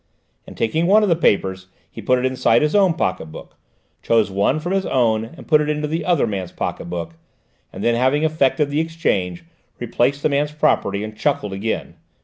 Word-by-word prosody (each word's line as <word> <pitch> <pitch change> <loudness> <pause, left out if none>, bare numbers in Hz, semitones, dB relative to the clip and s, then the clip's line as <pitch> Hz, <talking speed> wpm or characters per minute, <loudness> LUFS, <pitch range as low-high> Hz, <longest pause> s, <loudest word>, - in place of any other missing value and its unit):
and - - -12
taking 160 +10 0
one 210 +3 +5
of 205 - +1
the 170 - +4
papers 95 - 0 0.2
he - - -9
put 130 - +2
it 125 - -1
inside 130 -2 +2
his 150 - 0
own 190 -5 +4
pocket 90 - -2
book, 80 - -12 0.5
chose 110 -4 +2
one 100 +10 +1
from 175 +4 -4
his 195 -1 0
own 110 -4 +1
and 165 - -13
put 150 -2 +4
it 150 - -2
into 150 0 -1
the 160 +3 -2
other 175 -5 +2
man's 95 -5 -4
pocket - - -4
book, 85 -1 -5 0.6
and 95 - -7
then, 120 - +3
having 130 +5 +1
effected 150 -2 +1
this 145 - 0
exchange, 100 - -2 0.3
replaced 125 +4 0
the - - +3
man's 145 +1 0
property 105 -10 +1
and 110 0 -7
chuckled 105 -6 -1
again. 105 +3 -4
130 Hz, 200 wpm, -20 LUFS, 100-155 Hz, 0.6 s, one